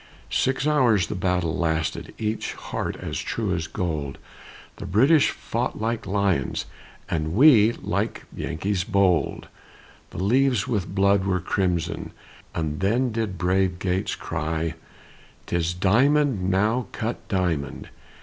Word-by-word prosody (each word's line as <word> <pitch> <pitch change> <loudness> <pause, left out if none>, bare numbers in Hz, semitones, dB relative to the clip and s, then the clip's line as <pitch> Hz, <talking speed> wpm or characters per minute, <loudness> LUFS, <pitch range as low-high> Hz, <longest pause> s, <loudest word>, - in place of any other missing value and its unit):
Six 130 +1 +1
hours 125 - +3
the - - -4
battle 90 -3 0
lasted, 80 -2 -1
Each 110 0 -2
heart - - -4
as - - -5
true 105 -5 -2
as 80 -2 -2
gold, 75 -7 -3 0.6
The - - -7
British 135 - +4
fought - - -3
like 110 -1 -2
lions, 100 -8 0 0.4
And 80 +1 -2
we 115 -4 +7
like - - -3
Yankees 90 +3 -2
bold; 95 -2 +1 0.6
The - - -10
leaves 125 -1 +2
with 100 -4 -2
blood 100 0 +3
were 95 -1 +1
crimson, 85 -2 -1 0.4
And 75 -2 -2
then 120 +6 +1
did 110 -4 -2
brave 90 +1 +1
Gates 90 0 -1
cry, 80 0 -2 0.7
"'Tis 85 0 -1
diamond 120 +2 +3
now 105 +5 +1
cut 115 +2 -4
diamond! 90 -8 -2
95 Hz, 125 wpm, -24 LUFS, 85-110 Hz, 0.7 s, we